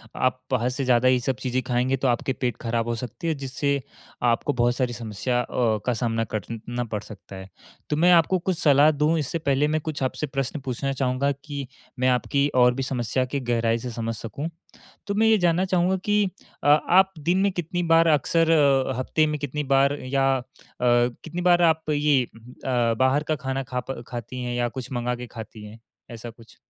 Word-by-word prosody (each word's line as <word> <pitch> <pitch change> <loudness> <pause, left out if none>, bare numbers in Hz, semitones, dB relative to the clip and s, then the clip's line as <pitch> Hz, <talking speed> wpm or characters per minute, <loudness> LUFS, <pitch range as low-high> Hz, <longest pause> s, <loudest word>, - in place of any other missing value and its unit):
आप 130 0 0
बाहर 125 -1 +1
से 130 +2 -3
ज़्यादा 125 0 +3
ये 130 0 +4
सब 130 +1 -1
चीज़ें 130 0 -1
खाएँगे 125 +2 +1
तो 135 - 0
आपके 125 +2 0
पेट 125 -3 -2
खराब 115 0 -1
हो 120 - -1
सकती 125 +9 -6
है, 160 - +1
जिससे 140 0 -2 0.4
आपको 120 +4 +1
बहुत 120 0 +1
सारी 125 -2 -1
समस्या 120 +2 -2
अ, - - -5 0.4
का 125 - +1
सामना 115 0 -1
करना 115 +4 -4
पड़ 105 -3 -4
सकता 100 -2 -12
है। 95 0 -9 0.4
तो 150 - +1
मैं 175 +3 +5
आपको 175 +2 +4
कुछ 175 -1 -2
सलाह 145 +1 +5
दूँ 150 +2 +1
इससे 155 +3 -2
पहले 145 -1 +1
मैं 155 0 0
कुछ 150 -3 -4
आपसे 145 +3 -2
प्रश्न 135 +2 -3
पूछना 135 +2 -2
चाहूँगा 130 +1 0
कि 140 -3 -5 0.3
मैं 130 - +2
आपकी 140 +3 +1
और 125 -1 +5
भी 135 +1 -3
समस्या 130 0 -1
की 140 +2 -3
गहराई 115 -2 0
से 125 +2 -5
समझ 115 0 -3
सकूँ। 140 +9 -5 0.6
तो 200 - -2
मैं 220 +2 +3
ये 220 0 +5
जानना 175 0 +2
चाहूँगा 185 0 +1
कि 210 0 +3 0.4
अ, - - +2
आप 185 +6 +5
दिन 175 +5 +1
में 200 - +3
कितनी 175 +1 -3
बार 165 0 +4
अक्सर 165 +2 +2
अ, 135 -5 +3
हफ्ते 155 +4 +1
में 150 0 -2
कितनी 145 +1 -3
बार 140 +1 +3
या 135 +1 0
अ, - - -7 0.4
कितनी 125 +7 +1
बार 175 -1 +4
आप 160 -2 +2
ये 145 -2 +3
हुँ, 115 - -16
हुँ 125 - -13 0.4
अ, - - +1
बाहर 130 +3 +3
का 155 - +1
खाना 135 0 -3
खा 125 -1 -4
प 120 -2 -5
खाती 125 +1 -6
हैं 125 0 -3
या 120 0 0
कुछ 130 +1 -7
मँगा 120 0 -1
के 125 0 -7
खाती 110 -2 -10
हैं, 105 +2 -12 0.3
ऐसा 115 0 -8
कुछ? 115 0 -18
130 Hz, 210 wpm, -24 LUFS, 120-150 Hz, 0.6 s, मैं